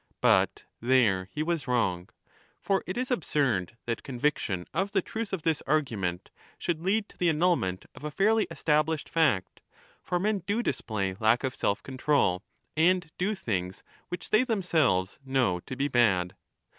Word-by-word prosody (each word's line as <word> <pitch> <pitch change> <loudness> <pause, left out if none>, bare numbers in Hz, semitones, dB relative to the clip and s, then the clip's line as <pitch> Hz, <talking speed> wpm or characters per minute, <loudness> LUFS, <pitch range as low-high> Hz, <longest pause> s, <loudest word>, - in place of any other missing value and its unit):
But - - +3 0.2
there 110 -7 +3
he 150 - -2
was 165 -3 -2
wrong. 95 -8 0 0.5
For 195 -1 0
it 185 - -4
is 255 +1 -2
absurd 130 - 0
that 115 -1 -2
conviction 120 -9 -1
of 200 +1 -1
the 195 - +3
truth 225 -1 -4
30 - - -1
of 160 - -18
this 160 -2 +1
argument 110 - -1 0.3
should 165 -2 -2
lead 200 +4 +1
to - - -19
the 175 - +3
annulment 155 - +1
of - - -13
a 150 - -2
fairly 215 +7 +2
established 155 0 0
fact. 145 - +1 0.4
For 175 - -1
men 205 +2 +1
do 215 +4 0
display 100 - -2
lack 110 +3 +3
of 130 -1 -1
self 100 -4 -1
control, 130 -8 +1 0.3
and 175 +1 +3
do 205 +4 +1
things 95 - -3 0.3
which 180 -1 -6
they 215 +3 +5
themselves 160 - +1
know 130 -9 +1
to 130 - -5
be 140 +2 0
bad. 100 -9 +2
145 Hz, 165 wpm, -28 LUFS, 105-180 Hz, 0.5 s, they